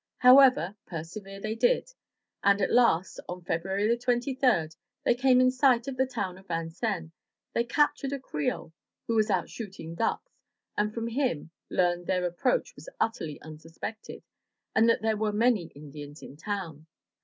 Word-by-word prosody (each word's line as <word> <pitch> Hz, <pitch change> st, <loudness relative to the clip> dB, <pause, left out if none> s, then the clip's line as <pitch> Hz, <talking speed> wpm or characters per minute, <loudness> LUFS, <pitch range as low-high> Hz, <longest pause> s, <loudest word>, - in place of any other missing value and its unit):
However, 250 Hz, -7 st, +6 dB
persevere 190 Hz, +4 st, -7 dB
they 215 Hz, +2 st, -3 dB
did, -, -, +1 dB, 0.5 s
and 200 Hz, 0 st, +4 dB
at 195 Hz, -, +1 dB
last, 210 Hz, -8 st, +3 dB
on 180 Hz, 0 st, -6 dB
February 190 Hz, +7 st, 0 dB
23, 245 Hz, -, +1 dB, 0.3 s
they -, -, +4 dB
came 250 Hz, +1 st, +4 dB
in 255 Hz, 0 st, +5 dB
sight 255 Hz, -1 st, +3 dB
of 270 Hz, -, -3 dB
the 260 Hz, +1 st, +1 dB
town 185 Hz, -7 st, -4 dB
of 190 Hz, -, -20 dB
Vincennes. 165 Hz, +1 st, -3 dB, 0.4 s
They 235 Hz, -, +1 dB
captured 285 Hz, +2 st, +1 dB
a 280 Hz, -, -3 dB
Creole 155 Hz, -, -3 dB, 0.3 s
who 230 Hz, -, -1 dB
was 220 Hz, -1 st, +2 dB
out 185 Hz, -4 st, +1 dB
shooting 195 Hz, -7 st, -8 dB
ducks, 230 Hz, -, -3 dB, 0.4 s
and 210 Hz, 0 st, 0 dB
from 230 Hz, +1 st, -4 dB
him 235 Hz, -, -1 dB, 0.2 s
learned 175 Hz, -1 st, +1 dB
that -, -, +2 dB
their 180 Hz, -1 st, 0 dB
approach 175 Hz, -, 0 dB
was -, -, -11 dB
utterly 165 Hz, -10 st, -2 dB
unsus 155 Hz, +1 st, -12 dB
pected, 220 Hz, 0 st, -7 dB, 0.5 s
and 225 Hz, +1 st, +4 dB
that 230 Hz, -, +2 dB
there 220 Hz, -1 st, +1 dB
were 215 Hz, 0 st, 0 dB
many 215 Hz, -3 st, +2 dB
Indians 145 Hz, +1 st, -10 dB
in 135 Hz, -, -10 dB
town. 165 Hz, -3 st, -5 dB
210 Hz, 165 wpm, -28 LUFS, 170-245 Hz, 0.5 s, However